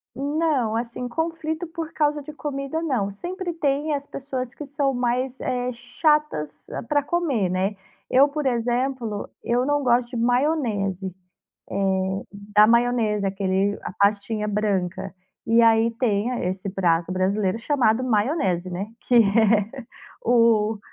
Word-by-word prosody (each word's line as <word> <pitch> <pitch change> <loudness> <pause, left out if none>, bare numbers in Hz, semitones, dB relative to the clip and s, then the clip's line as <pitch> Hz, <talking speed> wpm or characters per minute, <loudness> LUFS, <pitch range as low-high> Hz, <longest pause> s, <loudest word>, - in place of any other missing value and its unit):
Não, 280 -4 0
assim, 235 +1 -3
conflito 320 +3 -3
por 325 -1 -6
causa 295 -1 +1
de 305 +2 -9
comida, 290 +1 -4
não. 240 -10 0
Sempre 355 - -5
tem 295 -2 0
as 280 0 -5
pessoas 260 -3 -5
que - - -8
são 280 -1 0
mais, 250 +1 -1
eh, 250 0 -1
chatas 245 - -1 0.2
para 290 -1 +2
comer, 285 - 0
né. 190 +3 0 0.4
Eu, 275 +3 +6
por 295 -1 -3
exemplo, 240 -2 -1 0.2
eu 245 +2 +1
não 290 0 +1
gosto 240 -1 +2
de 245 - -5
maionese. 230 - 0 0.6
Eh, 190 0 0
da 205 +1 +3
maionese, 230 -3 +2
aquele 195 +1 0
a - - -5
pastinha 205 +1 +1
branca. 195 -2 -1 0.3
E 230 +1 +5
aí, 225 0 +5
tem 220 -1 +1 0.2
esse 190 +1 -4
prato 175 -2 +1
brasileiro 190 +2 0
chamado 245 -2 +2
maionese, 210 - 0
né. 185 +3 -3 0.2
Que 245 - +2
é 220 +1 +4 0.5
o 225 -2 +4
235 Hz, 135 wpm, -24 LUFS, 205-275 Hz, 0.6 s, Eu